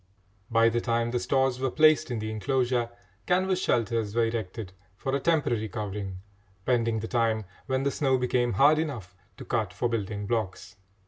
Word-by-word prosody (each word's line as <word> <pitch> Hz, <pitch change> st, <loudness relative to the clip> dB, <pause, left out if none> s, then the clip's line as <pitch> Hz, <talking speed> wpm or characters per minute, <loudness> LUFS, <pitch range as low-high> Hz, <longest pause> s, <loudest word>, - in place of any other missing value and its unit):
By 115 Hz, 0 st, +4 dB
the 120 Hz, +1 st, 0 dB
time 115 Hz, 0 st, 0 dB
the 125 Hz, -, 0 dB
stores 130 Hz, 0 st, +1 dB
were 130 Hz, 0 st, 0 dB
placed 155 Hz, +2 st, +4 dB
in 120 Hz, -, -2 dB
the 110 Hz, 0 st, -3 dB
enclosure, 120 Hz, +1 st, 0 dB, 0.4 s
canvas 185 Hz, +1 st, +2 dB
shelters 115 Hz, -, 0 dB
were 115 Hz, -1 st, +3 dB
erected 110 Hz, -3 st, -4 dB, 0.2 s
for 135 Hz, +3 st, -3 dB
a -, -, +1 dB
temporary 130 Hz, -8 st, +1 dB
covering, 100 Hz, -2 st, -4 dB, 0.5 s
pending 115 Hz, -3 st, +1 dB
the 115 Hz, -, -4 dB
time 115 Hz, -3 st, +1 dB, 0.2 s
when 130 Hz, 0 st, 0 dB
the 140 Hz, -, +1 dB
snow 135 Hz, -2 st, +1 dB
became 125 Hz, -1 st, +1 dB
hard 145 Hz, +9 st, +5 dB
enough 120 Hz, -, -4 dB, 0.2 s
to -, -, -9 dB
cut 110 Hz, -6 st, -1 dB
for 120 Hz, -, -1 dB
building 105 Hz, -2 st, -3 dB
blocks. 110 Hz, -2 st, -3 dB
120 Hz, 175 wpm, -27 LUFS, 110-130 Hz, 0.5 s, hard